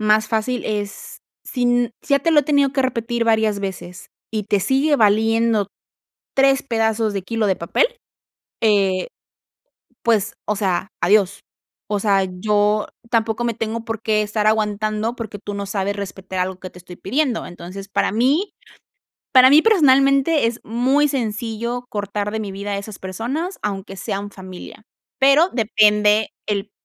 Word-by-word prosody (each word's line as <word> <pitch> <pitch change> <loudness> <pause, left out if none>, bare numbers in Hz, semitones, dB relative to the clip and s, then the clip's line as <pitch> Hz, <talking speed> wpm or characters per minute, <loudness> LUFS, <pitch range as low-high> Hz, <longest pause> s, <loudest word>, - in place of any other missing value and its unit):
más 215 0 +3
fácil 225 +3 -1
es 205 -2 -5 0.3
si 250 - -4
n 245 0 +2 0.2
ya 280 - +3
te 330 - +1
lo 305 -2 +6
he - - -6
tenido 285 -1 +2
que 275 - 0
repetir 235 -2 -1
varias 220 -2 +2
veces, 185 -2 -7 0.2
y 215 -2 -2
te 205 0 +1
sigue 275 +8 +2
valiendo 220 0 +3 0.7
3 270 0 +4
pedazos 225 -3 0
de 195 - -2
kilo 225 +2 -2
de 190 - +2
papel, 170 - +1 0.8
eh, 195 -4 +2 1.0
pues, 225 -2 +1
o 210 - 0
sea, 190 -2 -1
adiós. 195 +1 +2 0.5
O 205 -1 0
sea, 195 -2 +2
yo 210 +3 +1 0.2
tampoco 225 -1 0
me 235 -1 0
tengo 225 +1 -4
por 225 -1 -4
qué 215 -1 +1
estar 210 0 -1
aguantando, 215 +1 0
porque 220 -3 -6
tú 205 - -5
no 200 0 -4
sabes 200 0 -2
respetar 190 -1 -6
algo 185 0 -3
que 185 - -7
te - - -14
estoy 180 0 -12
pidiendo. 255 +3 -1
Entonces, 185 +3 -9
para 200 - 0
mí 275 - +1 0.8
para 260 -1 +8
mí 305 +2 +7
personalmente 275 - +4
es 235 +1 -4
muy 260 +6 +2
sencillo 235 -1 -3
cortar 205 0 -3
de 220 - -3
mi 205 -2 -5
vida 200 +1 -5
a 200 - -1
esas 200 0 -9
personas, 250 - -4
aunque 195 -1 -4
sean 200 +2 -4
familia, 190 +2 -11 0.4
pero 285 +6 +5
depende 210 -2 +3 0.2
el 205 0 -2
215 Hz, 160 wpm, -20 LUFS, 200-245 Hz, 1.0 s, para